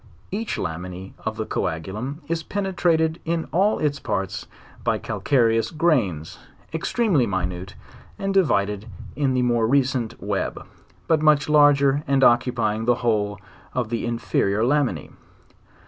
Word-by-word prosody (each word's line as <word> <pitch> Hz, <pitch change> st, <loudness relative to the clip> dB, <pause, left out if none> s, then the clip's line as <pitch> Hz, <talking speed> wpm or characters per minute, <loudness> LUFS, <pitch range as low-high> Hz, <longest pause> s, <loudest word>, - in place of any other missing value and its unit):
Each 215 Hz, +4 st, -3 dB
laminse 90 Hz, +3 st, -5 dB
of 110 Hz, -1 st, -2 dB
the 110 Hz, -, -2 dB
coagulum 110 Hz, -, -3 dB
is 165 Hz, -1 st, -1 dB
penetrated 170 Hz, -4 st, 0 dB
in 165 Hz, 0 st, -2 dB
all 195 Hz, +5 st, +3 dB
its 145 Hz, -2 st, -1 dB
parts 95 Hz, 0 st, -3 dB, 0.4 s
by -, -, +1 dB
calcareous 115 Hz, -4 st, +1 dB
grains, 120 Hz, -, 0 dB, 0.3 s
extremely 165 Hz, -, +1 dB
minute, 90 Hz, -1 st, -3 dB, 0.4 s
and 195 Hz, 0 st, -2 dB
divided 105 Hz, -, +1 dB, 0.3 s
in 135 Hz, -3 st, +1 dB
the 125 Hz, -, +2 dB
more 120 Hz, -2 st, +2 dB
recent 130 Hz, -3 st, +1 dB
web, -, -, -3 dB, 0.4 s
but 160 Hz, -2 st, +3 dB
much 150 Hz, -2 st, +4 dB
larger 145 Hz, -2 st, +5 dB
and 135 Hz, -1 st, +2 dB
occupying 120 Hz, -3 st, +2 dB
the 120 Hz, 0 st, +4 dB
whole 105 Hz, -3 st, +1 dB, 0.4 s
of 125 Hz, -3 st, -1 dB
the 115 Hz, 0 st, -2 dB
inferior 110 Hz, -3 st, 0 dB
laminse 130 Hz, -, 0 dB
125 Hz, 130 wpm, -23 LUFS, 105-155 Hz, 0.4 s, larger